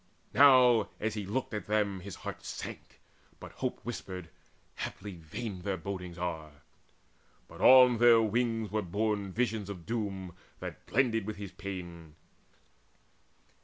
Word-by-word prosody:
Now, 125 Hz, -6 st, +6 dB
as 110 Hz, 0 st, -1 dB
he 105 Hz, -3 st, -4 dB
looked 120 Hz, +3 st, -2 dB
at 105 Hz, -, -4 dB
them, 105 Hz, -2 st, +1 dB
His 95 Hz, 0 st, -8 dB
heart -, -, -7 dB
sank; -, -, -8 dB, 0.4 s
now -, -, -9 dB
hope -, -, -4 dB
whispered, 90 Hz, -3 st, -6 dB, 0.5 s
"Haply 105 Hz, -, -5 dB
vain 95 Hz, +4 st, -6 dB
Their 95 Hz, +1 st, -2 dB
bodings 90 Hz, -3 st, -6 dB
are!" 80 Hz, -4 st, -5 dB, 0.8 s
but -, -, -12 dB
on 125 Hz, -2 st, +8 dB
their 120 Hz, -1 st, +7 dB
wings 115 Hz, -1 st, 0 dB
were 110 Hz, 0 st, 0 dB
borne 100 Hz, +1 st, -1 dB
Visions 110 Hz, -2 st, -1 dB
of 90 Hz, -5 st, -7 dB
doom 100 Hz, -6 st, -3 dB, 0.3 s
that -, -, -8 dB
blended 115 Hz, -4 st, +1 dB
with 110 Hz, -, -3 dB
his 100 Hz, -2 st, -7 dB
pain. 85 Hz, -5 st, -8 dB
100 Hz, 135 wpm, -31 LUFS, 90-115 Hz, 0.8 s, on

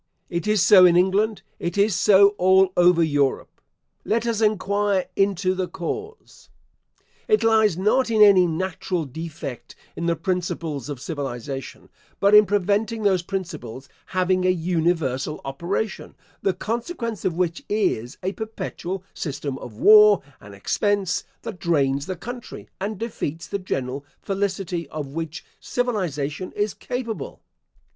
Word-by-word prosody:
It 170 Hz, +2 st, -2 dB
is 215 Hz, -4 st, +3 dB
so 190 Hz, -3 st, +8 dB
in 175 Hz, -1 st, +6 dB
England, 200 Hz, +4 st, +2 dB, 0.2 s
it 170 Hz, +2 st, -3 dB
is 200 Hz, -1 st, +3 dB
so 200 Hz, +2 st, +6 dB
all 190 Hz, 0 st, +4 dB
over 175 Hz, -1 st, +5 dB
Europe. 145 Hz, -4 st, -1 dB, 0.4 s
Let 230 Hz, +2 st, 0 dB
us 230 Hz, -2 st, -1 dB
enquire 205 Hz, -2 st, +1 dB
into 195 Hz, -2 st, +1 dB
the 185 Hz, -1 st, -2 dB
cause. 420 Hz, -, -7 dB, 0.8 s
It 430 Hz, -2 st, +3 dB
lies 220 Hz, -5 st, +3 dB
not 220 Hz, +7 st, +2 dB
in 220 Hz, -1 st, +1 dB
any 190 Hz, -3 st, +6 dB
natural 180 Hz, 0 st, -2 dB
defect 140 Hz, -3 st, -7 dB, 0.2 s
in 170 Hz, -, -3 dB
the 170 Hz, -, +2 dB
principles 165 Hz, -, -3 dB
of 140 Hz, -4 st, -5 dB
civilisation, 135 Hz, -3 st, -6 dB, 0.3 s
but 200 Hz, +1 st, +3 dB
in 210 Hz, -1 st, +8 dB
preventing 205 Hz, +3 st, 0 dB
those 190 Hz, -3 st, +3 dB
principles 155 Hz, -, -6 dB, 0.2 s
having 185 Hz, 0 st, +1 dB
a 185 Hz, -, +3 dB
universal 165 Hz, -5 st, 0 dB
operation; 170 Hz, +9 st, -3 dB, 0.3 s
the 190 Hz, -2 st, 0 dB
consequence 230 Hz, -, -4 dB
of 180 Hz, -, 0 dB
which 175 Hz, -1 st, -1 dB
is, 150 Hz, -, -1 dB
a 190 Hz, -, 0 dB
perpetual 195 Hz, -4 st, -5 dB
system 145 Hz, -3 st, -4 dB
of 115 Hz, -, -10 dB
war 210 Hz, -, +7 dB, 0.2 s
and 100 Hz, -1 st, -13 dB
expense, 200 Hz, -, 0 dB, 0.2 s
that 180 Hz, -, -7 dB
drains 140 Hz, -4 st, +1 dB
the 185 Hz, -, -3 dB
country, 240 Hz, +7 st, -8 dB
and 205 Hz, +2 st, -3 dB
defeats 175 Hz, -8 st, -4 dB
the 200 Hz, -, -4 dB
general 135 Hz, -7 st, -3 dB, 0.2 s
felicity 190 Hz, -4 st, -2 dB
of 150 Hz, -2 st, -5 dB
which 160 Hz, +3 st, -6 dB
civilisation 185 Hz, -, -2 dB
is 205 Hz, -1 st, -1 dB
capable. 240 Hz, -3 st, -5 dB
185 Hz, 135 wpm, -23 LUFS, 160-205 Hz, 0.8 s, so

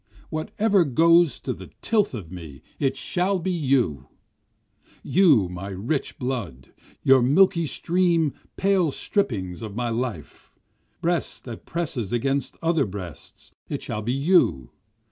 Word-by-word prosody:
Whatever 195 Hz, +5 st, +1 dB
goes 165 Hz, +3 st, +4 dB
to 130 Hz, -, -2 dB
the -, -, -11 dB
tilth 210 Hz, -, +1 dB
of 90 Hz, -7 st, -8 dB
me 80 Hz, -7 st, -10 dB, 0.2 s
it 135 Hz, -1 st, 0 dB
shall 185 Hz, +7 st, 0 dB
be 185 Hz, +1 st, -2 dB
you! 130 Hz, -, 0 dB, 1.0 s
You 155 Hz, -, +4 dB
my 90 Hz, +2 st, -7 dB
rich 105 Hz, +10 st, -3 dB
blood! 110 Hz, -, -5 dB, 0.3 s
your 135 Hz, -1 st, +6 dB
milky 165 Hz, +5 st, +4 dB
stream 170 Hz, -2 st, +1 dB, 0.2 s
pale 190 Hz, -4 st, +2 dB
strippings 105 Hz, -, -2 dB
of 110 Hz, -3 st, -7 dB
my 120 Hz, 0 st, -1 dB
life! 115 Hz, -, -5 dB, 0.5 s
Breast 170 Hz, 0 st, -1 dB
that 120 Hz, -3 st, -9 dB
presses 145 Hz, -, -3 dB
against 135 Hz, +3 st, -1 dB
other 165 Hz, -6 st, +2 dB
breasts 90 Hz, -5 st, -10 dB, 0.2 s
it -, -, -4 dB
shall 105 Hz, -, -4 dB
be 120 Hz, +4 st, -1 dB
you! 135 Hz, -, +2 dB
135 Hz, 130 wpm, -24 LUFS, 105-170 Hz, 1.0 s, your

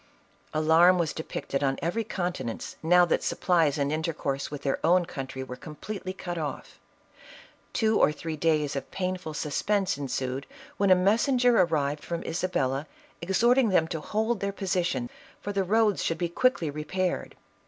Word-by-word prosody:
Alarm 160 Hz, +4 st, +5 dB
was 170 Hz, -3 st, 0 dB
depicted 145 Hz, -3 st, -4 dB
on 135 Hz, -1 st, +1 dB
every 175 Hz, +9 st, -1 dB
countenance, 175 Hz, -, -4 dB
now 180 Hz, +2 st, +5 dB
that -, -, +1 dB
supplies 165 Hz, -6 st, +2 dB
and 140 Hz, 0 st, 0 dB
intercourse 155 Hz, -4 st, -2 dB
with 145 Hz, -1 st, -7 dB
their 135 Hz, -, -1 dB
own 175 Hz, +2 st, +4 dB
country 135 Hz, -6 st, -6 dB
were 125 Hz, -1 st, -7 dB
completely 185 Hz, +7 st, -7 dB
cut 175 Hz, -2 st, -5 dB
off. 150 Hz, -2 st, -6 dB, 0.9 s
Two 220 Hz, -2 st, +2 dB
or -, -, +5 dB
three 160 Hz, +2 st, -5 dB
days 150 Hz, -2 st, +1 dB
of 135 Hz, -, -4 dB
painful 185 Hz, -4 st, -3 dB
sus 150 Hz, -1 st, -2 dB
pense 200 Hz, -7 st, +1 dB
ensued, 130 Hz, -1 st, -3 dB, 0.3 s
when 200 Hz, -1 st, +2 dB
a 185 Hz, -, +8 dB
messenger 235 Hz, +6 st, +3 dB
arrived 150 Hz, -6 st, +1 dB
from 170 Hz, -1 st, -4 dB
Isabella, 145 Hz, -5 st, -1 dB, 0.3 s
exhorting 235 Hz, +7 st, +3 dB
them 165 Hz, -4 st, +3 dB
to 160 Hz, -3 st, -3 dB
hold 220 Hz, +5 st, -1 dB
their 200 Hz, 0 st, -1 dB
position, 180 Hz, -10 st, -1 dB, 0.3 s
for 205 Hz, -, -5 dB
the 195 Hz, -1 st, +1 dB
roads 215 Hz, +1 st, +2 dB
should 165 Hz, -, 0 dB
be 175 Hz, 0 st, -1 dB
quickly 170 Hz, -, +1 dB
repaired. 175 Hz, +5 st, -2 dB
170 Hz, 160 wpm, -27 LUFS, 150-190 Hz, 0.9 s, a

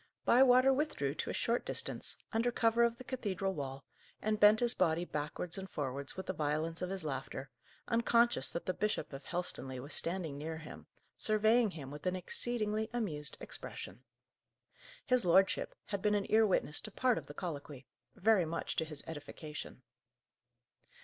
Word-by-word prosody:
Bywater 255 Hz, +1 st, +6 dB
withdrew 260 Hz, -, 0 dB
to -, -, -3 dB
a -, -, -2 dB
short 235 Hz, +1 st, +1 dB
distance, -, -, -3 dB, 0.2 s
under 230 Hz, +2 st, +2 dB
cover 230 Hz, 0 st, +3 dB
of 235 Hz, 0 st, +3 dB
the 255 Hz, -, -9 dB
cathedral 200 Hz, -7 st, -2 dB
wall, 135 Hz, -3 st, -5 dB, 0.3 s
and 215 Hz, 0 st, 0 dB
bent 210 Hz, +1 st, +7 dB
his 240 Hz, 0 st, +2 dB
body 170 Hz, -1 st, +2 dB
backwards 150 Hz, +4 st, -3 dB
and 190 Hz, 0 st, -7 dB
forwards 140 Hz, +1 st, -4 dB
with 190 Hz, -, -4 dB
the 185 Hz, -, -2 dB
violence 155 Hz, +1 st, -1 dB
of 180 Hz, -, -2 dB
his 190 Hz, -4 st, -4 dB
laughter, 135 Hz, -1 st, -4 dB, 0.4 s
unconscious 230 Hz, -, +3 dB
that 170 Hz, -, -4 dB
the 185 Hz, -, 0 dB
Bishop 210 Hz, -6 st, -1 dB
of 135 Hz, 0 st, -8 dB
Helstonleigh 135 Hz, -7 st, -3 dB
was 140 Hz, +5 st, -6 dB
standing 165 Hz, -5 st, -1 dB
near 160 Hz, +2 st, -4 dB
him, 155 Hz, -1 st, -10 dB, 0.3 s
surveying 220 Hz, +2 st, +4 dB
him 145 Hz, -7 st, -8 dB
with 150 Hz, +5 st, -6 dB
an 180 Hz, -, +1 dB
exceedingly 215 Hz, +2 st, -1 dB
amused 155 Hz, -, -2 dB
expression. 100 Hz, +8 st, -7 dB, 1.0 s
His 250 Hz, -1 st, +3 dB
lordship 190 Hz, +2 st, +3 dB
had 200 Hz, -2 st, -3 dB
been 210 Hz, 0 st, +3 dB
an 200 Hz, -1 st, 0 dB
ear 220 Hz, 0 st, +6 dB
witness 160 Hz, -5 st, +1 dB
to 215 Hz, -, -8 dB
part 250 Hz, +2 st, +2 dB
of -, -, -14 dB
the -, -, -9 dB
colloquy, 145 Hz, -6 st, -6 dB, 0.3 s
very 205 Hz, -2 st, +4 dB
much 165 Hz, +1 st, -3 dB
to 160 Hz, -, +1 dB
his 150 Hz, -2 st, -5 dB
edification. 150 Hz, -3 st, -7 dB
185 Hz, 170 wpm, -34 LUFS, 150-220 Hz, 1.0 s, bent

